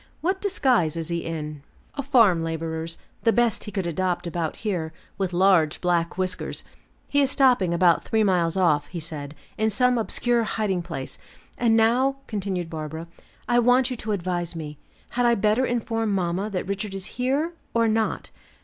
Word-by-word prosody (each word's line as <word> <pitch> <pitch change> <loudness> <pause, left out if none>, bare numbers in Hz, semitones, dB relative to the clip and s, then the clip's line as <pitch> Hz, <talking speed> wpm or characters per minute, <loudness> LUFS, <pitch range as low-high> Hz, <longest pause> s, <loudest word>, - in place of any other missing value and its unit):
What 375 +3 0
disguise 255 - +2
is 165 0 -4
he 170 0 -1
in?" 150 -3 -5 0.3
"A 280 - -3
farm 230 - +4
laborer's, 165 0 -3 0.2
the 230 - +4
best 235 -2 +1
he 210 - -6
could 190 -2 -2
adopt 175 +1 -1
about 170 -2 -2
here, 175 -7 -3 0.3
with 190 -2 0
large 175 -4 +3
black 175 -1 0
whiskers. 185 -1 -3 0.4
He 285 - +2
is 275 - +3
stopping 250 -10 +3
about 170 0 +3
three 220 -1 +1
miles 180 -3 +2
off, 150 -6 +2
he 175 - -6
said, 155 -2 -6 0.2
in 220 0 +3
some 250 +2 +2
obscure 240 +2 +1
hiding 210 -5 -1
place. 150 -6 -6 0.4
And 230 -2 +3
now," 245 +5 +3
continued 190 -5 -3
Barbara, 160 +1 -6 0.4
"I 240 0 +4
want 250 +2 +4
you 250 - -3
to 220 -1 -4
advise 175 -3 -2
me; 150 -2 -7 0.3
had 245 0 +2
I 235 - +4
better 215 +5 +2
inform 225 -2 -1
mamma 185 +2 -1
that 190 -2 -3
Richard 200 0 -3
is 190 -1 -4 0.2
here, 285 +7 +1 0.2
or 230 0 +4
not?" 220 0 -1
190 Hz, 175 wpm, -24 LUFS, 170-235 Hz, 0.4 s, farm